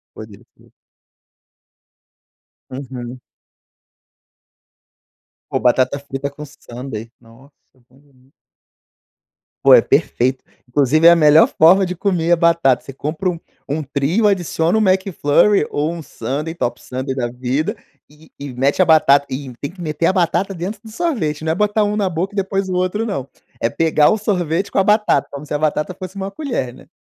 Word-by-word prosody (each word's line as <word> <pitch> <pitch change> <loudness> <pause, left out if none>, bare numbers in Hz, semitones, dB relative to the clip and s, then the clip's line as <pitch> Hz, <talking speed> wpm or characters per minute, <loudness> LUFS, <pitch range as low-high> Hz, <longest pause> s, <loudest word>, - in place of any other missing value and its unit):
Poderia 110 -2 -12
ser. - - -24 2.0
Uhum. 130 -2 -7 2.3
Pô, - - 0
batata 130 +2 +2
frita 140 0 -5
com 150 +2 -10
sundae, 120 -4 -9
nossa 120 +5 -19 0.2
é - - -29
uma 130 +2 -23
delicia. 135 -2 -28 1.3
Pô, - - +6
é - - +8
perfeito. 130 +2 0 0.2
Inclusive, 145 +5 +3
é 170 - +10
a - - +5
melhor 155 -1 +6
forma 185 +4 +6
de 180 - -4
comer 175 -2 0
a 175 - +6
batata, 165 -7 +2
você 135 - -9
compra 155 +7 -3
um 170 - -6 0.3
um 150 +3 -1
trio, 145 +9 0
adiciona 175 -2 +1
o - - +2
McFlurry 190 -1 +2
ou 150 +3 -1
um 170 - -7
sundae, 145 +5 -5
top 120 -8 -4
sundae 130 +1 -4
da 125 -3 -2
vida 130 - -2 0.4
e 150 +1 -20
e 140 -1 -7
mete 135 +8 +1
a - - +5
batata, 150 -4 +5
e 130 0 -5
tem 140 - -4
que 180 +1 -15
meter 160 0 -1
a - - +3
batata 180 +1 0
dentro 195 +4 -5
do 220 - -11
sorvete, 215 - -2
não 160 - +1
é - - -1
um - - -8
botar 210 +1 +1
na 200 -3 +1
boca 180 +5 -3
e - - -10
depois 195 0 -1
o 185 - -2
outro 185 +5 -1
não, 190 - -4 0.3
é 115 - 0
pegar 155 +1 +3
o 220 - +1
sorvete 185 -3 -1
com - - -1
a - - +2
batata, 210 +1 +2
como 140 +1 -8
se - - -5
a - - 0
batata 155 +3 -1
fosse 185 +1 -9
uma 195 0 -4
colher, 200 - -4
né. - - -16
155 Hz, 175 wpm, -18 LUFS, 135-185 Hz, 2.3 s, é